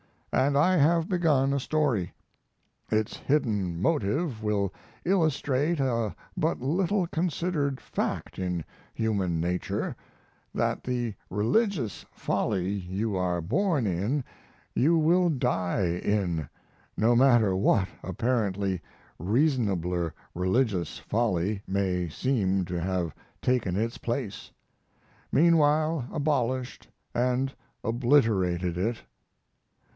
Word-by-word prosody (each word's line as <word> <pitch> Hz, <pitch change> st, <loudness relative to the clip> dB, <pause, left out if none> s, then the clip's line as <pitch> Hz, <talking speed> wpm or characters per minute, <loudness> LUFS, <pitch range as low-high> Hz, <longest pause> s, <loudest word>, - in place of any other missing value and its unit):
And 140 Hz, +2 st, +3 dB
I 180 Hz, +5 st, +4 dB
have 165 Hz, +2 st, +3 dB
begun 150 Hz, -7 st, +2 dB
a 140 Hz, -, +1 dB
story. 130 Hz, -, 0 dB, 0.8 s
Its 110 Hz, -1 st, 0 dB
hidden 105 Hz, -, 0 dB
motive 140 Hz, -, 0 dB
will 100 Hz, -3 st, 0 dB, 0.3 s
illustrate 155 Hz, -3 st, +1 dB
a 115 Hz, -5 st, 0 dB, 0.2 s
but -, -, 0 dB
little 180 Hz, +8 st, +1 dB
considered 165 Hz, -4 st, -1 dB
fact -, -, -3 dB
in 90 Hz, -3 st, -2 dB, 0.3 s
human 100 Hz, -7 st, 0 dB
nature: 90 Hz, +1 st, -2 dB, 0.6 s
that -, -, 0 dB
the 120 Hz, -3 st, -1 dB, 0.2 s
religious 120 Hz, -, 0 dB
folly 95 Hz, -2 st, -1 dB
you 100 Hz, +2 st, -2 dB
are 90 Hz, -2 st, 0 dB
born 145 Hz, -, +1 dB
in 105 Hz, +10 st, 0 dB, 0.5 s
you 165 Hz, +6 st, +3 dB
will 175 Hz, +3 st, +4 dB
die 95 Hz, -, 0 dB
in, 90 Hz, -8 st, 0 dB, 0.5 s
no 115 Hz, +2 st, +4 dB
matter 120 Hz, -6 st, +5 dB
what 95 Hz, 0 st, +2 dB
apparently 100 Hz, -2 st, -1 dB, 0.4 s
reasonabler 95 Hz, -, +1 dB, 0.2 s
religious 95 Hz, -, 0 dB
folly 105 Hz, -3 st, 0 dB
may 95 Hz, -3 st, 0 dB
seem 95 Hz, -, 0 dB
to 90 Hz, 0 st, -3 dB
have 90 Hz, -3 st, -1 dB, 0.3 s
taken 120 Hz, -8 st, +1 dB
its 115 Hz, +3 st, -1 dB
place; 120 Hz, -5 st, -4 dB, 0.8 s
meanwhile 155 Hz, -3 st, +3 dB
abolished 130 Hz, -5 st, -1 dB, 0.3 s
and 125 Hz, +2 st, +1 dB, 0.3 s
obliterated 110 Hz, -8 st, +2 dB
it. 115 Hz, +5 st, -1 dB
115 Hz, 100 wpm, -28 LUFS, 95-145 Hz, 0.8 s, matter